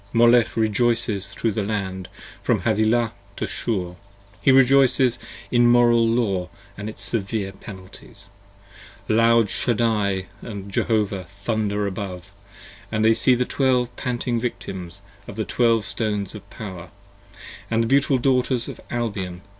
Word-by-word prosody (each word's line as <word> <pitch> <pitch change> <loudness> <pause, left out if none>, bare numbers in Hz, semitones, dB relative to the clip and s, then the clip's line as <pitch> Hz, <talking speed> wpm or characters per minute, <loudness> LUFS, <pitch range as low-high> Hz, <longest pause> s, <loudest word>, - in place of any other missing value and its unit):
Molech 120 0 +4
rejoices 110 -2 +1
thro' 110 +3 -2
the 105 - -2
Land 95 -3 -3 0.3
from - - +1
Havilah 110 +1 +2 0.2
to - - -3
Shur: 90 -6 -3 0.4
he 135 - +5
rejoices 130 -2 +4 0.3
In 120 -1 +5
moral 120 -1 +5
law 100 -6 0
& 100 0 -26
its 105 +1 -7
severe 100 -2 -2
penalties; 100 +2 -12 0.8
loud 115 -1 +4
Shaddai 105 -5 0 0.2
& 100 -3 -7
Jehovah 105 -2 0
40 - - -22 0.2
Thunder 105 -2 0
above, 95 -1 -5 0.6
when 110 0 0
they 110 0 +6
see 125 +3 +3
the 125 +1 0
Twelve 125 -3 +1
panting 120 -2 -2
Victims 95 -6 -5 0.3
On - - -8
the 110 -1 -2
Twelve 115 -3 +2
Stones 105 -3 -2
of 105 - -11
Power, 95 -5 -8 0.4
& - - -15
the 115 - 0
beautiful 135 +2 +3
Daughters 125 -1 +1
of - - -8
Albion. 100 -7 -3
110 Hz, 135 wpm, -23 LUFS, 100-120 Hz, 0.8 s, they